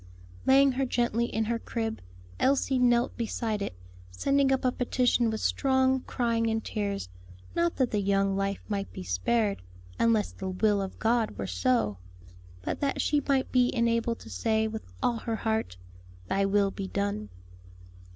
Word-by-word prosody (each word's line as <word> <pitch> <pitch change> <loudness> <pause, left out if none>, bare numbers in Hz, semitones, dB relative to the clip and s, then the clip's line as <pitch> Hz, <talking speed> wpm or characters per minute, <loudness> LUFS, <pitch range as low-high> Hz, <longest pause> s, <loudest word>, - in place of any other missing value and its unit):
Laying 275 +1 +6
her 265 +1 0
gently 235 -1 +1
in 220 -1 -1
her 230 +1 -1
crib, 225 -2 -3 0.4
Elsie 265 -1 +2
knelt 240 -1 +3
beside 225 -2 -2
it, 200 - -3 0.3
sending 275 - +2
up 265 -1 +1
a 255 - +4
petition 245 -1 +1
with 220 -1 -3
strong 265 -1 +2
crying 230 -2 0
and 225 0 -1
tears; 200 - -2 0.5
not 170 0 +1
that 260 -3 +1
the 210 - +1
young 195 0 +2
life 195 0 -2
might 200 -2 -3
be - - -7
spared, 195 - 0 0.4
unless 225 -2 +2
the 190 - -5
will 200 +2 +2
of 190 -1 -5
God 225 -1 +1
were 100 - -3
so, 105 +2 0 0.6
but - - -3
that 280 -1 -1
she 295 -1 +2
might 270 -2 +1
be 250 -1 +4
enabled 230 0 +1
to - - -11
say, 220 - +1
with 220 - -7
all 235 - +2
her 225 0 -3
heart, 220 - -2 0.5
"Thy 195 0 +2
will 200 0 +2
be 195 -1 -5
done." 200 - -2
220 Hz, 165 wpm, -28 LUFS, 195-245 Hz, 0.6 s, Laying